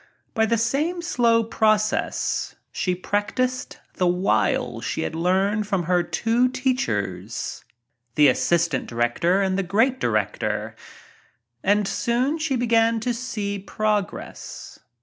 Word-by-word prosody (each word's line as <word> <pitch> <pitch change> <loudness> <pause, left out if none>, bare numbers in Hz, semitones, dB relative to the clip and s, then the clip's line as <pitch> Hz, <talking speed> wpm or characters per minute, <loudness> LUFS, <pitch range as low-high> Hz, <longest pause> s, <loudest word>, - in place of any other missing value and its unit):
By 220 -2 +2
the 230 - +2
same 300 +10 0
slow 235 -8 +3
process 215 -1 0 0.2
she 180 -1 -1
practised 250 +7 -2 0.2
the 180 - +2
wiles 120 - +1
she - - -2
had - - -3
learned 190 +5 +1
from 195 -4 0
her 175 +1 +2
two 230 +8 +1
teachers^ 110 - -2 0.2
— 120 0 -49
the 150 -1 +6
assistant 165 +2 +1
director 120 +11 +1
and 190 0 0
the - - +2
great 225 +8 +1
director 110 0 -1 0.5
— 120 0 -39
and 205 +1 +2
soon 255 +10 0
she 310 -4 0
began 230 -1 +2
to 245 +2 0
see 215 -5 -3
progress. 210 0 -3
200 Hz, 130 wpm, -23 LUFS, 150-230 Hz, 0.5 s, the